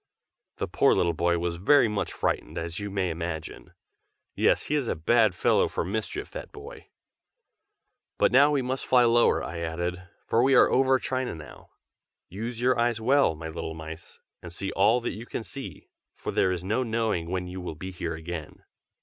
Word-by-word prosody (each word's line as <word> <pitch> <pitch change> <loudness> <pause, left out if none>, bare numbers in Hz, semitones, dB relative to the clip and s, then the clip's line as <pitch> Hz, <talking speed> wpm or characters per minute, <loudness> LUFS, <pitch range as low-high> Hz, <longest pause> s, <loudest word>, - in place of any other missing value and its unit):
The - - -2
poor - - +3
little 85 -1 +2
boy 85 +1 +1
was 85 0 -2
very 120 +8 +5
much 105 -2 -2
frightened, - - -2
as 85 0 -4
you 105 0 -4
may 95 -3 -1
imagine. 80 -1 -6 0.6
Yes, - - +2
he - - -3
is 145 -5 0
a - - -1
bad 110 +4 +3
fellow - - +3
for - - -3
mischief, 105 +4 -4
that - - -8
boy. - - -11 1.3
"But - - +3
now 140 +4 +6
we 145 -3 +1
must 130 +1 -3
fly 125 -1 +5
lower," 120 0 +3
I 85 0 -5
added, 85 +2 -3 0.2
"for 115 - +2
we 135 +2 +4
are - - +6
over 130 0 +4
China 130 -5 -3
now. 80 -2 -12 0.6
Use 115 +5 -5
your 125 0 +2
eyes 120 -1 +1
well, 130 - +3
my 80 +1 -7
little 80 0 -5
mice, 80 0 -10 0.2
and 85 - -9
see 95 +3 -4
all 110 +6 +3
that - - -3
you 115 +3 -9
can - - -4
see, 95 - -9 0.2
for - - -5
there 95 - +2
is 90 -1 -3
no 110 +7 0
knowing 110 -8 -1
when 90 0 -2
you 90 +1 -7
will 90 -3 -6
be 95 +5 -7
here 85 -2 -4
again." 80 -1 -7
95 Hz, 190 wpm, -27 LUFS, 85-120 Hz, 1.3 s, now